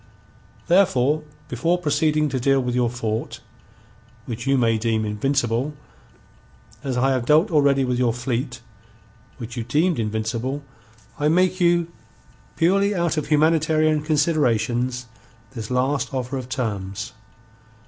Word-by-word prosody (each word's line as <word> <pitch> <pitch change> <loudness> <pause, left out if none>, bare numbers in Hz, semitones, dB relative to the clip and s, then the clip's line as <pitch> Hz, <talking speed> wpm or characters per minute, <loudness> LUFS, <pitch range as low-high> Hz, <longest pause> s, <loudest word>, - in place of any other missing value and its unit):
Therefore 155 -5 +3 0.3
before 165 +9 0
proceeding 150 -2 +1
to 130 - -2
deal 135 +2 +3
with 125 -1 -2
your 125 -1 +1
fort, 115 -2 -4 0.9
which 120 +2 -6
you 135 0 +3
may 115 -3 +2
deem 110 -1 0
invincible, 125 +5 -1 1.1
as 130 -3 -2
I 135 +2 +2
have 130 -2 -1
dealt 160 +6 +4
already 140 -3 +3
with 125 -1 -1
your 125 -2 +2
fleet, 125 +1 -3 0.8
which 115 -1 -7
you 120 - -3
deemed 155 +6 +1
invincible, 115 +5 -2 0.6
I 150 - +2
make 180 +3 +2
you, 170 -1 +2 0.6
purely 200 +4 +2
out 170 -2 0
of 155 -2 -2
humanitarian 155 0 +3
considerations, 125 -6 0 0.5
this 115 -4 -7
last 130 +3 0
offer 130 +1 -3
of 130 -1 -5
terms. 100 -5 -4
135 Hz, 130 wpm, -22 LUFS, 120-155 Hz, 1.1 s, dealt